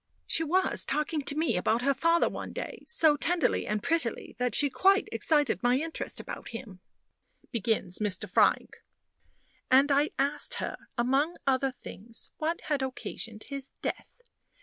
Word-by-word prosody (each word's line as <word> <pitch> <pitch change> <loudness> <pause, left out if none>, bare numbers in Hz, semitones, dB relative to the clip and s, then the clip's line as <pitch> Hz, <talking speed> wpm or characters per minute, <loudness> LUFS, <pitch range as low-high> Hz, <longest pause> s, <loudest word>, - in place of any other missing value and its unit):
"She 325 - +1
was 365 +4 +1
talking 300 +1 0
to 285 +1 -2
me 320 -7 +1
about 225 +6 +1
her 275 +1 +3
father 335 +5 +3
one - - -5
day - - -6
so 320 -11 +4
tenderly 340 +4 0
and 210 -1 -1
prettily, 325 -8 -1
that 250 -3 0
she 290 - +4
quite 390 +8 +3
excited 295 - +1
my 245 +1 +3
interest 320 +3 -4
about - - -7
him," 230 -6 -8 0.7
begins 220 -5 +1
Mr. 210 0 -1
Frank; 180 - +2 0.9
"and 270 +3 +5
I 285 +2 +3
asked 280 +2 +1
her, - - -5
among 270 +8 +2
other 270 0 +2
things, 230 -3 -8
what 325 +2 -1
had 295 -3 -1
occasioned 235 -4 -5
his 275 -1 -6
death. - - -3
275 Hz, 150 wpm, -29 LUFS, 235-310 Hz, 0.9 s, and